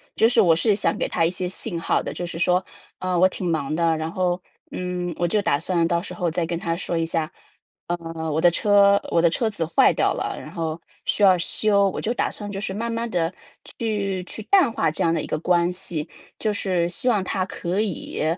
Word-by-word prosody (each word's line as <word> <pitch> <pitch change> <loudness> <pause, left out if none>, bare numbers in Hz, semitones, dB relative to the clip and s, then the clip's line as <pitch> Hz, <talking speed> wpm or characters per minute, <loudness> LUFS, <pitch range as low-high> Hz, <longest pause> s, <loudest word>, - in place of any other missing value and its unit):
就 225 - +4
是 245 -1 +2
我 170 -6 +6
是 200 +5 +2
想 - - 0
给 - - 0
他 165 - +1
一 - - +2
些 180 0 -4
信 180 -1 -4
号 165 - +1
的， - - -5
就 175 - -4
是 170 -1 -6
说， 180 +1 +2 0.4
呃， 185 -1 -1
我 185 - +7
挺 185 -1 -4
忙 155 -2 -1
的， 165 -1 +2
然 160 +1 -3
后， 180 0 0 0.3
嗯， 180 -1 -3
我 175 - +1
就 210 +5 +1
打 140 - +2
算 170 0 +1
到 170 0 +1
时 - - -8
候 180 -4 -1
再 165 0 -1
跟 170 0 -3
他 165 -2 -2
说 175 -1 -2
一 165 - +1
下。 165 -1 -1 0.6
呃， 165 -2 -4
我 155 - 0
的 175 - +6
车 200 +2 +4
我 165 - +3
的 170 - +5
车 225 +7 0
子 185 -6 -3
坏 165 - +4
掉 - - +2
了， - - -3
然 - - -9
后 165 -1 -3 0.2
需 - - -1
要 190 -3 +7
修， 200 +3 +2
我 - - -5
就 230 - -1
打 - - -1
算 205 -1 -7
就 195 -1 -4
是 190 - -3
慢 230 +3 -3
慢 230 0 -2
地 165 -3 0 0.5
去 200 -5 -1
去 200 - -9
淡 365 - +4
化 165 - +1
这 155 - -2
样 165 - +3
的 165 - 0
一 - - -6
个 - - -1
关 175 +1 +2
系， 175 -4 -4 0.3
就 215 -2 0
是 185 -4 0
希 215 +8 -1
望 210 -4 +3
他 185 0 -1
可 185 +2 -2
以， 195 -6 -3
180 Hz, 260 characters per minute, -23 LUFS, 165-200 Hz, 0.6 s, 我